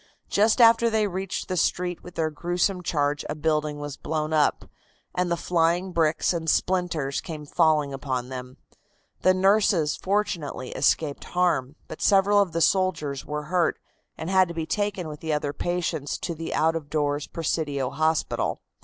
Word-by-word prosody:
Just 215 +4 +3
after 230 0 +6
they 220 -1 +2
reached 190 -1 -3
the 185 - -2
street 180 0 0
with 180 - -12
their 160 -1 0
gruesome 175 +4 -1
charge 145 -3 0
a 150 - -2
building 150 -1 0
was 145 -1 -6
blown 155 0 -2
up, 150 -1 +2 0.5
and 180 0 0
the 170 - 0
flying 175 +2 +1
bricks 165 0 +1
and 165 -1 -2
splinters 170 -8 0
came 155 -3 -7
falling 155 -2 +2
upon 130 -2 -3
them. 130 0 -7 0.6
The 185 0 +4
nurses 190 -5 +3
fortunately 185 -10 -2
escaped 145 +2 0
harm, 170 -7 0
but 160 - -9
several 205 +1 +4
of 195 -4 0
the 165 - -1
soldiers 155 -8 +1
were 150 0 -3
hurt, 175 +2 +1 0.4
and 165 +4 -4
had 190 -1 +5
to 170 - -7
be 165 -1 -2
taken 205 -2 -2
with 150 -1 -7
the 160 -1 -2
other 145 -1 -1
patients 170 -3 -2
to 170 - -2
the 165 0 -6
out 160 +1 +2
of 155 -3 -5
doors 145 -1 -1
Presidio 145 -5 -2
hospital. 160 0 0
165 Hz, 170 wpm, -25 LUFS, 150-180 Hz, 0.6 s, after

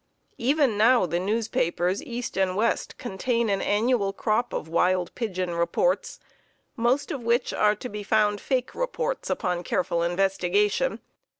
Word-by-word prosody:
Even 265 -4 +2
now 235 -1 +5
the 170 0 -1
newspapers 190 -3 0
east 240 0 -5
and 190 -1 +1
west 220 +4 0
contain 235 +1 -1
an 195 - 0
annual 210 -1 +1
crop 220 +4 0
of - - -4
wild 180 +2 +1
pigeon 185 -7 -3
reports, 170 - 0 0.6
most 245 +3 +1
of 275 - -4
which 235 +2 +1
are 210 0 +3
to 230 - -7
be 210 -3 -6
found 210 -1 +1
fake 255 -2 -1
reports - - -3
upon 180 -1 -1
careful 170 -1 -1
investigation. 195 - +1
210 Hz, 140 wpm, -25 LUFS, 185-245 Hz, 0.6 s, now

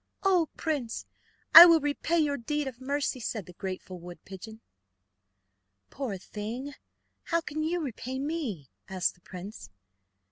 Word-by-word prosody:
"Oh, 360 -5 +3
prince, 280 -8 -3 0.5
I 340 +2 +14
will 335 -1 +6
repay 295 +3 -1
your 295 -3 +2
deed 295 +3 -2
of 255 -1 -8
mercy, 280 0 -1
said 220 -4 -4
the 180 - -13
grateful 185 0 -6
wood 175 0 -10
pigeon. 220 +4 -10 1.3
"Poor 255 -8 -4
thing! 225 +9 -6 0.5
how 335 - +1
can 310 -1 -5
you 335 +3 0
repay 260 -2 -5
me?" 270 - -4 0.2
asked 185 -2 0
the 180 - -28
prince. 180 - -9
260 Hz, 140 wpm, -29 LUFS, 195-300 Hz, 1.3 s, I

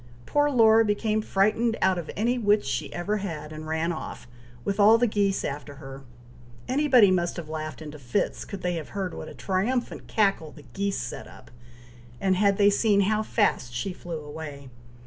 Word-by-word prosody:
Poor 290 0 +2
Laura 225 -4 +5
became 215 0 0
frightened 215 +3 +1
out 190 -1 +2
of 165 - -7
any 240 +4 0
wits 210 -1 +2
she - - -2
ever 200 +5 -2
had, 155 -6 -6
and 155 0 -8
ran 160 +2 -1
off, 160 - -7 0.4
with 200 +1 -2
all 215 +3 +7
the 245 - +3
geese 200 -3 0
after 145 0 -5
her! 135 -1 -10 0.7
Anybody 255 -7 +5
must 175 -2 0
have 165 -3 -7
laughed 155 0 -5
into 150 0 -9
fits, 130 +9 -2
could 200 - -8
they 180 0 0
have 155 - -7
heard 190 -2 -2
what - - -7
a - - -11
triumphant 220 +6 -2
cackle 195 -8 +1
the 150 - -15
geese 200 0 -1
set - - -6
up, - - -15 0.7
and 190 +4 +2
had 200 +1 +3
they 205 0 +5
seen 200 -1 +3
how 215 +2 +1
fast 205 - 0
she 180 +10 -3
flew 170 -2 -6
away. 145 -2 -8
195 Hz, 185 wpm, -26 LUFS, 155-215 Hz, 0.7 s, all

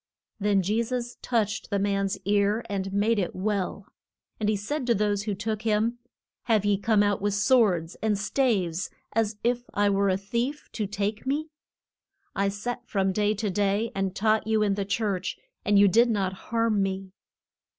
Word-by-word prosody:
Then 200 -2 +2
Je 210 +5 +1
sus 245 +1 -3
touched 220 -4 -1
the 200 - 0
man's 195 -1 0
ear 205 +3 +2
and 195 -1 -3
made 205 +3 +2
it 180 - -2
well. 200 0 -2 0.5
And 210 -1 +1
he 215 - +2
said 250 +7 -3
to 235 - +4
those 205 0 0
who 210 -2 -1
took 215 +1 -3
him, 225 +2 +1 0.5
Have 220 -4 +2
ye 205 -1 +2
come 210 0 +3
out 205 -1 +1
with 205 0 0
swords 205 -7 +3
and 215 -2 +1
staves 200 -6 0 0.2
as 220 -1 0
if 245 +1 +1
I 205 0 +3
were 200 0 +2
a 185 - +2
thief, 235 +9 -3
to 210 -3 -2
take 205 +4 -3
me? 300 +3 -1 0.8
I 200 0 +1
sat 240 +4 -5
from 195 -2 +1
day 210 +2 +1
to 210 -1 -2
day 205 +3 +1
and 195 -1 -2
taught 220 +1 +2
you 220 -1 +2
in 205 -1 +2
the 200 0 -2
church, 200 -2 -1 0.3
and 205 0 +3
you 200 0 +7
did 230 +5 +4
not 195 -4 0 0.2
harm 230 -3 +2
me. 190 0 -2
205 Hz, 180 wpm, -26 LUFS, 195-225 Hz, 0.8 s, you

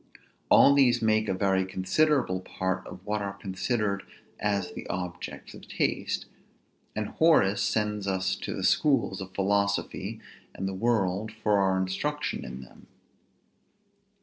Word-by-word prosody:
All 140 - +7
these 125 -4 +4
make 110 -1 +2
a - - +2
very 95 0 +2
considerable 95 +4 +1
part 95 0 -3
of 90 +2 -11
what 105 0 -1
are 100 -1 -4
considered 100 +1 -1 0.4
as 100 -2 -1
the - - -7
objects 90 0 -5
of - - -13
taste; - - -1 0.7
and 105 -1 -2
Horace 155 -12 +4
sends 105 -2 0
us 95 -1 0
to - - -5
the - - -4
schools 125 -10 +2
of 95 0 -9
philosophy 100 +1 0 0.4
and 95 - -3
the 95 - -3
world 100 -1 0
for 105 -2 +1
our 95 -1 +2
instruction 145 +12 -2
in 65 +1 -7
them. 65 - -16
100 Hz, 140 wpm, -28 LUFS, 95-110 Hz, 0.7 s, All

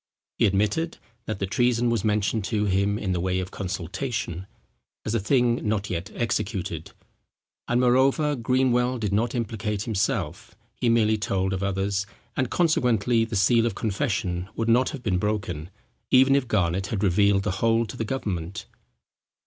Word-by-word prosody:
He - - +5
admitted, 105 - 0 0.3
that 110 - -2
the 100 - -1
treason 120 +3 +1
was 115 - 0
mentioned 105 0 +1
to 105 -1 0
him 100 +1 +1
in 100 -4 -2
the 90 - 0
way 90 +1 0
of 95 0 -5
consultation, 95 0 -4 0.6
as 110 - -1
a 115 - +2
thing 120 +2 +2
not 105 -1 -1
yet 85 +1 -3
executed; 105 -4 -2 0.7
and 120 - +2
moreover 135 +4 +3
Greenwell 125 0 +1
did 105 -4 -2
not 115 +4 +1
implicate 105 -3 -2
himself; 110 -5 -2 0.2
he 120 - 0
merely 110 -2 +3
told 95 -2 0
of 95 - -3
others, 100 0 -1 0.3
and 130 -3 0
consequently 125 - +2
the 115 0 -5
seal 115 +4 +4
of 110 - -3
confession 100 -6 -2
would 115 0 -1
not 125 +3 +4
have 140 -5 -7
been 90 -4 +1
broken, 95 -6 -2 0.4
even 135 +1 +6
if 140 -3 +1
Garnet 95 -3 0
had 105 -1 -2
revealed 100 +1 +3
the 105 - 0
whole 115 0 +3
to 120 - -8
the 115 - -2
government. 100 -8 -4
110 Hz, 165 wpm, -25 LUFS, 95-120 Hz, 0.7 s, even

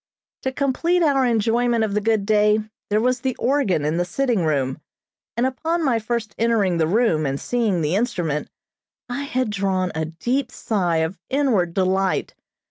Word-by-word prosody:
To 265 - -2
complete 310 +7 +1
our 275 -4 +3
enjoyment 230 +1 +2
of 210 -2 -1
the 210 - +1
good 220 -1 +1
day, 210 0 +4 0.3
there 210 +1 +2
was 250 +2 +1
the 260 -1 -1
organ 235 - +1
in 155 +2 0
the 175 - +2
sitting 230 +2 0
room, 140 -3 -1 0.6
and 240 - +2
upon 320 +6 -1
my 240 -4 +2
first 225 -1 -3
entering 215 -7 +2
the 160 - +2
room, 170 -6 +2
and 135 +1 -2
seeing 220 -8 0
the 150 +2 0
instrument 175 - -1 0.6
I 265 +3 -3
had 255 -4 -1
drawn 190 -3 0
a 160 0 -2
deep 240 - -2
sigh 185 -9 -1
of 175 +3 -7
inward 230 -12 +1
delight. 190 0 +1
215 Hz, 170 wpm, -22 LUFS, 180-250 Hz, 0.6 s, day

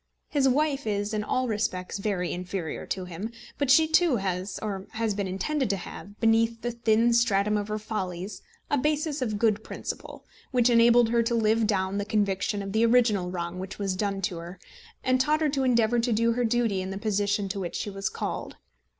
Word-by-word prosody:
His 275 -2 +3
wife 285 -1 +1
is 205 0 -1
in 210 -1 -1
all 255 +4 0
respects 205 -4 -2
very 195 -4 -1
inferior 180 -2 -4
to 185 -1 -3
him; 180 +6 -6 0.3
but 285 -2 0
she, 315 +4 +6
too, 320 -2 +4
has, 190 -2 -2
or 195 -3 -4
has 220 -1 0
been 200 -1 -2
intended 260 +8 -1
to 200 - +1
have, 205 +2 -10
beneath 225 0 +2
the 240 - -1
thin 235 0 +2
stratum 210 -3 +3
of 205 -1 -1
her 215 0 -2
follies 195 -3 -4 0.3
a 290 - +3
basis 300 +1 0
of 215 -4 -1
good 220 -1 +2
principle, - - -7 0.2
which 250 -1 +3
enabled 235 0 +6
her 235 0 +3
to 235 +1 0
live 220 0 +2
down 195 -1 0
the 205 - -2
conviction 200 -1 0
of 195 - -5
the 220 +3 +2
original 230 -6 +3
wrong 175 0 -4
which 190 +1 -6
was 195 -2 -1
done 195 0 -2
to 180 -2 -1
her, 170 +2 -9 0.4
and 255 0 +3
taught 305 +4 +2
her 305 - +3
to 275 -1 0
endeavour 240 -2 +3
to 235 +1 0
do 230 +1 +3
her 240 +1 0
duty 225 -4 +1
in 185 - -4
the 195 - -4
position 205 -1 0
to 195 +1 -3
which 175 -3 -4
she 205 - -3
was 195 0 -2
called. - - -5
215 Hz, 210 wpm, -27 LUFS, 195-235 Hz, 0.4 s, she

